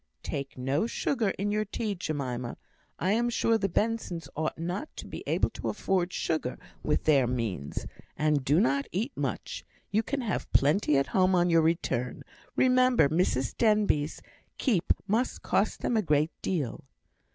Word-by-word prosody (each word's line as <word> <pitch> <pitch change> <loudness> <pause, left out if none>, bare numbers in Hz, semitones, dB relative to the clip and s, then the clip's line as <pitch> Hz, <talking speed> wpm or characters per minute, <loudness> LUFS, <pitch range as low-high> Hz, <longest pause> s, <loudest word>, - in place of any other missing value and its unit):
"Take 140 -1 -4
no 135 - 0
sugar 235 -3 0
in 205 +2 -1
your 210 +1 +1
tea, 215 +1 -3
Jemima. 130 -9 -3 0.4
I 185 - 0
am 235 +3 +2
sure 230 -1 +2
the 195 -1 0
Bensons 185 -6 -1
ought 155 +1 -2
not 175 - -3
to - - -7
be - - -7
able - - +1
to - - -4
afford 185 -2 0
sugar, 155 -8 -2 0.2
with 150 - 0
their 140 -5 +4
means. 110 - -3 0.3
And 150 -2 +2
do 145 +5 +3
not 140 -5 +2
eat 220 +10 -1
much; - - -3 0.3
you 210 +2 +3
can 270 +4 -3
have 220 -7 -3
plenty 150 +1 +4
at 135 - +3
home 185 -1 +4
on 175 0 +3
your 165 -1 +5
return; 135 -7 0 0.3
remember 255 - +4
Mrs 145 -6 +1
Denbigh's 210 -9 +2 0.3
keep 205 - +1
must 225 +6 0
cost 205 +2 +1
them 240 - 0
a 220 - +4
great 155 -2 +2
deal." 150 -11 -2
175 Hz, 165 wpm, -29 LUFS, 140-215 Hz, 0.4 s, your